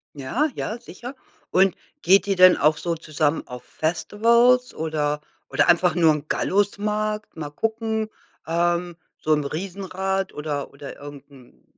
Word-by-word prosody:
Ja. 220 - -1
Ja, 220 - -3
sicher. 245 +7 -9 0.4
Und 190 0 +4 0.3
geht 195 +3 +4
ihr 195 - +1
denn 185 0 +7
auch 150 +1 +3
so 170 +1 -2
zusammen 155 -1 -1
auf 125 0 -9
Festivals 235 +9 +2
oder 150 -2 -2 0.3
oder - - +2
einfach 175 -1 +4
nur 165 -3 +5
im 150 0 -5
Gallusmarkt? 210 +3 -1
Mal 150 -2 -5
gucken, 220 +3 -2 0.4
ähm, 175 +1 0 0.2
so 155 - +1
'n 150 -1 +1
Riesenrad 190 +3 -3
oder 150 -2 -4
oder 140 0 -9
irgend 145 0 -11
'n 130 -3 -19
175 Hz, 145 wpm, -23 LUFS, 155-205 Hz, 0.4 s, denn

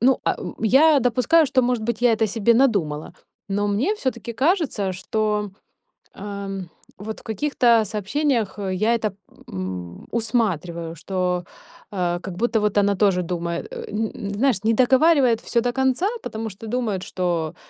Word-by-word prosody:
ну, 260 +3 +3
а - - +2
о - - -6
я 280 +6 +5
допускаю, 250 +7 +3
что, 255 -1 +2
может 245 -2 0
быть, 230 0 -2
я 245 -2 +5
это 220 0 +2
себе 225 +2 +2
надумала. 200 - +1 0.3
Но, 205 +1 0
мне 225 - +1
всё-таки 260 - -3
кажется, 265 - +1
что, 210 +2 -1 0.6
эм, 200 -1 -5 0.3
вот 215 +2 -7
в - - -17
каких-то 235 0 +2
сообщениях 220 +3 -1
я 215 +5 +2
это, 215 -3 -2 0.4
м, 90 -2 -6
усматриваю. 180 -8 -1
Что, 180 +1 -2 0.5
э, 175 -3 -1
как 180 -1 -7
будто 235 +1 +1
вот 210 -1 0
она 200 0 +3
тоже 190 -2 +3
думает, 170 -1 -3
э, - - -6
н 215 +1 -1
н 200 - -5
знаешь, 220 -2 +1
не 225 - +4
договаривает 260 -1 +4
всё 235 - +1
до 245 +1 -1
конца, 265 +6 +1 0.2
потому 220 0 -4
что 200 +3 -10
думает, 220 -5 -2
что: 170 -4 -2
215 Hz, 160 wpm, -23 LUFS, 190-245 Hz, 0.6 s, я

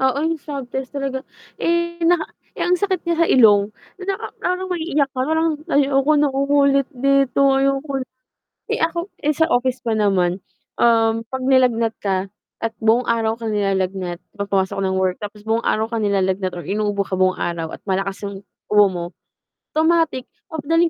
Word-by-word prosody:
Oo, 265 0 +2
yung 325 -1 -1
swab 280 -2 -5
test 265 +1 -4
talaga, 270 -1 -2 0.4
eh, 340 0 0
naka 335 -1 +3 0.3
eh, - - -3
ang 360 - +4
sakit 375 -1 0
niya 340 - +2
sa - - 0
ilong. 210 -4 +5 0.3
Na - - -6
naka - - -6
parang 365 +1 -1
maiiyak 320 -5 0
ka, 255 - -3
parang, 320 +1 +1 0.2
"Ayoko 275 +1 +3
nang 290 -2 +2
umulit 280 0 +3
dito, 275 +1 +3
ayoko." 275 0 0 0.7
Eh, - - 0
ako 340 +3 -1
eh, 300 +1 0
sa 320 +3 +1
office 250 -1 +1
pa 225 -2 0
naman, 185 -3 +2 0.4
um, 225 -1 +3
'pag 260 +3 -5
nilagnat 250 -4 +3
ka 190 -1 -2 0.3
at 225 - 0
buong 225 +2 +3
araw 225 -1 +1
kang 225 -1 -5
nilalagnat, 190 -3 -1 0.2
'pag 200 - -2
pumasok 190 -1 0
ng 190 -1 0
work 185 -1 0
tapos 210 0 -8
buong 225 +2 0
araw 220 +1 +1
ka 230 - -1
nilalagnat 190 -2 0
or 175 - -6
inuubo 205 0 -1
ka 190 -1 -4
buong 185 0 +3
araw 165 -2 -3
at - - -12
malakas 195 0 -2
yung 200 -1 -7 0.2
ubo 210 -1 +6
mo, 175 -2 -4 0.7
automatic 320 -4 +2 0.3
papadalhin 330 +2 +1
245 Hz, 175 wpm, -20 LUFS, 200-290 Hz, 0.7 s, ubo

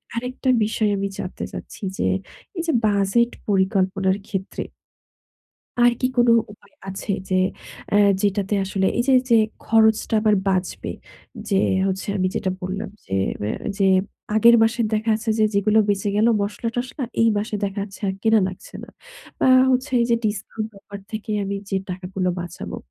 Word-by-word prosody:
আরেকটা 250 +2 -2 0.2
বিষয় 215 0 0
আমি 200 - -1
জানতে 185 - -5
চাচ্ছি - - -9
যে - - 0 0.5
এই 335 - 0
যে 325 - +2
বাজেট 205 +4 +2 0.2
পরিকল্পনার 190 -1 +1
ক্ষেত্রে 195 0 -4 1.2
আর 240 0 +6
কি 255 - +2
কোনো 240 -1 +5 0.2
উপায় 220 - -21
আছে 195 +2 -5 0.2
যে 185 - 0 0.6
অ্যা 205 - +3 0.2
যেটাতে 200 0 0
আসলে 190 0 0
এই - - +3
যে, - - +5 0.2
যে 235 - +6 0.3
খরচটা 220 0 +3
আমার 215 -1 +4
বাঁচবে, 185 -1 -1 0.6
যে 195 - +1 0.3
হচ্ছে 190 +1 -3
আমি 185 -1 +1
যেটা 190 - -1
বললাম 190 +3 -4 0.2
যে 95 - -12 0.3
ম্যা 105 - -1 0.2
যে 195 - +2 0.5
আগের 235 +2 +7
মাসের 225 0 +2
দেখা 220 +1 0
আছে 225 +1 -8
যে 215 - +4
যেগুলো 210 +2 +3
বেঁচে 205 0 0
গেলো 220 +3 +4
মশলা-টশলা, 235 +6 -3 0.2
এই 230 - +5
মাসে 210 +1 -3
দেখা 200 +1 -3
যাচ্ছে 200 -1 -9
আর 190 - -1
কেনা 220 -1 +4
লাগছে 185 - -11
না। - - -11 0.5
বা - - +3 0.2
হচ্ছে 255 +3 0
এইযে 235 0 +2
ডিসকাউন্ট 215 +1 -3
অফার 200 0 -10
থেকে 215 0 -5
আমি 200 0 -3 0.2
যে 195 - +1
টাকাগুলো 185 0 -3
বাঁচাবো, 175 0 -7
205 Hz, 160 wpm, -22 LUFS, 195-225 Hz, 1.2 s, আগের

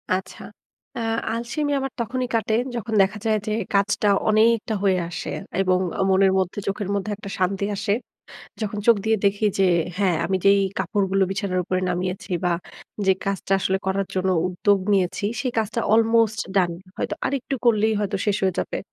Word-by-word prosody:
আচ্ছা। 185 0 -2 0.6
আ - - -2 0.3
আলসেমি 245 +6 -2
আমার 270 0 -3
তখনই 250 +2 -2
কাটে 220 -1 +1 0.2
যখন 230 -1 -4
দেখা 195 +2 +1
যায় 220 -1 +3
যে - - 0 0.2
কাজটা 200 +1 +2 0.2
অনেকটা 220 +1 +3
হয়ে 190 -2 +3
আসে 165 - -5 0.3
এবং 185 -1 +3 0.3
মনের 190 0 +4
মধ্যে 185 +2 -2
চোখের 200 0 -2
মধ্যে 200 +1 -2
একটা 200 0 -9
শান্তি 190 +2 0
আসে। 200 +1 0 0.7
যখন 210 -1 -3
চোখ 235 -1 +7
দিয়ে 220 0 +3
দেখি 200 +2 +2
যে 195 - +4 0.3
হ্যাঁ 190 -4 +2
আমি 190 - +1
যেই 200 0 +6 0.2
কাপড়গুলো 195 -2 +1
বিছানার 195 -1 -1
উপরে 185 +1 -1
নামিয়েছি 180 +2 -3
বা 175 - +2 0.5
যে 190 - +6
কাজটা 195 0 -2
আসলে 190 0 +1
করার 195 0 0
জন্য 190 0 0 0.2
উদ্যোগ 195 +3 +2
নিয়েছি 190 0 +1 0.2
সেই 255 -2 -2
কাজটা 225 +1 -1
আলমোস্ট 225 0 +3 0.2
ডান 180 -3 +3 0.3
হয়তো - - -2
আরেকটু 275 0 -2
করলেই 220 -2 +3
হয়তো 205 -2 -1
শেষ 205 -1 +2
হয়ে 190 -2 +2
যাবে। - - -2
200 Hz, 170 wpm, -23 LUFS, 190-220 Hz, 0.7 s, চোখ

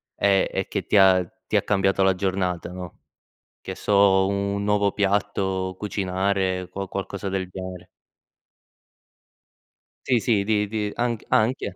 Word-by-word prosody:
e 100 -1 +2
e - - -2
che - - -3
ti - - +2
ha 95 -2 +6 0.2
ti - - -2
ha - - +4
cambiato 95 -1 +1
la 95 0 +4
giornata, 90 -2 -2
no, 90 -1 -9 0.6
che - - -7
so, 100 -2 +4
un 100 0 -1
nuovo 105 -1 +2
piatto, 95 -2 -1
cucinare, 95 -2 -1
qua 95 0 -5
qualcosa 100 0 -5
del 95 -1 -3
genere. 95 -1 -8 2.2
Sì, 125 -3 +3
sì, 105 -1 +1
di 105 0 +1
di 105 -1 -3
anch 120 -2 -2
anche. 110 -4 +1
100 Hz, 140 wpm, -24 LUFS, 95-100 Hz, 2.2 s, ha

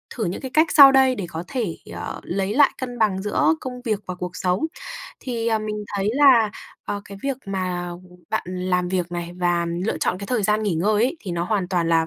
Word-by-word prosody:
thử 230 - -1
những 175 - -3
cái 265 - -6
cách 315 +3 +5
sau 280 -2 +10
đây 265 -1 +4
để 200 - -4
có 165 0 -5
thể, 220 -9 -3 0.2
ờ, - - -5
lấy 195 +2 -2
lại 285 +4 +5
cân 245 -2 -5
bằng 195 -3 +2
giữa 190 -6 +2
công 250 -1 -6
việc 215 -5 -1
và 185 - -4
cuộc 180 0 -6
sống. 180 +10 0 0.6
Thì, 235 -3 -3
ờ, 220 -1 +2
mình 210 -1 -4
thấy 200 +1 +1
là, 260 -6 +6 0.3
ờ, 205 - -3
cái 200 0 -10
việc 275 -1 -1
mà 185 -2 -2 0.4
bạn - - 0
làm 180 0 -1
việc 180 -1 -2
này 175 0 -4
và 175 -1 +1 0.2
lựa - - -1
chọn 180 - 0
cái 200 - -6
thời 245 -2 0
gian 210 +2 +2
nghỉ 200 -5 0
ngơi 200 +7 +1
ấy 265 +8 -1
thì 195 - -6
nó 170 0 -1
hoàn 190 -2 -1
toàn 175 -3 0
là 165 -1 +3
200 Hz, 235 wpm, -23 LUFS, 180-235 Hz, 0.6 s, sau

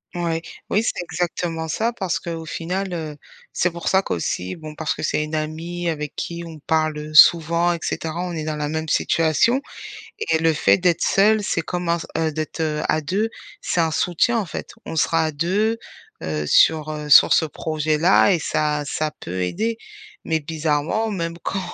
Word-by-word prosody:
Ouais. 170 -2 -1 0.3
Oui, 210 - +3
c'est 225 - -2
exactement 165 -1 -3
ça 225 +9 -1
parce 190 -7 -2
qu'au 165 -1 -5
final, 180 +4 -3
heu, 155 -3 -5 0.4
c'est 175 - +1
pour 170 0 -7
ça 190 - +4
qu'aussi 90 - -3
bon 155 -1 -9
parce 160 0 -2
que - - -7
c'est 150 - 0
une 155 +1 -4
amie 165 +3 -4
avec 150 -3 -3
qui 170 0 -5
on 160 -1 -9
parle, 155 -1 +1
heu, 150 0 -7
souvent 170 +3 +6
et - - -3
cetera, 165 +1 -3
on 180 - -4
est 160 -2 -3
dans 155 0 -3
la 150 -1 -2
même 160 +1 -3
situation 165 - +2 0.6
et 160 -1 +1
le 160 0 +2
fait 155 - +4
d'être 175 -2 +2
seule, 210 +2 +4
c'est 170 - 0
comme 175 +1 -3
un 170 - +2
s - - -7
heu, 160 -1 0
d'être, 155 +2 -5
heu, 155 -1 0
à 155 - +1
2 200 +9 0 0.3
c'est 175 - 0
un 165 - +1
soutien, 180 +8 +1
en 210 - -2
fait. - - -6 0.2
On 165 - -5
sera 165 +1 +2
à - - -1
2, 195 +9 +1 0.5
heu, 75 -1 -2
sur, 155 - +4
heu, 150 -1 -5
sur - - +8
ce - - +3
projet-là 155 +4 +2
et 175 - +2
ça 150 -1 0
ça 155 +2 -1
peut 90 +2 -4
aider. 220 - -1 0.5
Mais 160 0 +1
bizarrement, 155 +7 -1
même 170 -4 -3
quand 195 - -2
160 Hz, 195 wpm, -22 LUFS, 155-175 Hz, 0.6 s, sur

